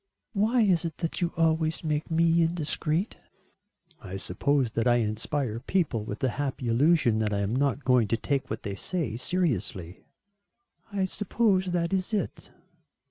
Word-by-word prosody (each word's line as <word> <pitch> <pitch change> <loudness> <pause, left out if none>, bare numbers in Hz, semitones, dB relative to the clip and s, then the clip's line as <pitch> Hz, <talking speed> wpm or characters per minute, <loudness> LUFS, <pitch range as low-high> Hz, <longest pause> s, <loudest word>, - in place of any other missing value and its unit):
"Why 220 +4 +2
is 185 -6 +3
it 165 -2 -4
that 165 +1 -3
you 175 -1 +1
always 160 -1 +1
make 150 -1 -1
me 165 +1 +3
indiscreet?" 165 +2 -1 0.8
"I 95 -3 -7
suppose 135 +4 0
that 115 +1 0
I 120 - +5
inspire 115 +2 -1
people 140 - 0
with 105 - -5
the 130 - +2
happy 130 -3 -2
illusion 130 -2 +3
that 110 -1 0
I 100 -1 0
am 100 +4 -1
not 140 +1 0
going 125 -4 +4
to 115 - +1
take 140 +3 -2
what 110 - -4
they 100 - -3
say 140 - -2
seriously." 115 - -2 0.9
"I 195 -2 0
suppose 195 0 +1
that 175 0 0
is 190 +3 0
it." 205 - -3
150 Hz, 160 wpm, -27 LUFS, 115-175 Hz, 0.9 s, I